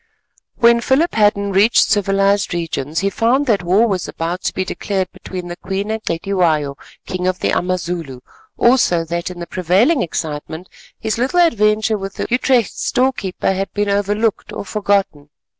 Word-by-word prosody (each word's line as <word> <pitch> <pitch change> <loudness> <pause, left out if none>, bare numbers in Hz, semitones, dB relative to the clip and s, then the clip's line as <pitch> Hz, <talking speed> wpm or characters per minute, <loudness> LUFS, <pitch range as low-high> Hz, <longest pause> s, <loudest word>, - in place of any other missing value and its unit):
When 235 -1 +4
Philip 285 +8 +2
Hadden 205 -2 +2
reached 200 +5 +4
civilised 195 -2 +2
regions, 160 -3 -3
he 200 0 0
found 245 +7 +2
that 220 -6 +2
war 185 +6 +3
was 190 -5 -2
about 170 +3 -4
to - - 0
be 190 - -1
declared 190 -1 -3
between 180 -2 -7
the 175 - -6
Queen 195 +4 -4
and 220 0 -3
Cetywayo, 165 -6 0 0.3
King 185 -1 -3
of 185 0 0
the - - -1
Amazulu; 175 -7 -2 0.4
also 230 -9 +3
that 170 +2 -3
in 180 - -9
the 170 - -5
prevailing 190 - +2
excitement 160 0 -5 0.3
his 220 +1 -2
little 270 +9 +1
adventure 215 -7 +2
with 195 0 -6
the - - -3
Utrecht 245 -2 +2
store 260 +1 +1
keeper 190 -3 -2
had 195 +1 -3
been 205 0 0
overlooked 205 +2 0
or - - -6
forgotten. 195 -9 -1
195 Hz, 165 wpm, -18 LUFS, 175-220 Hz, 0.4 s, When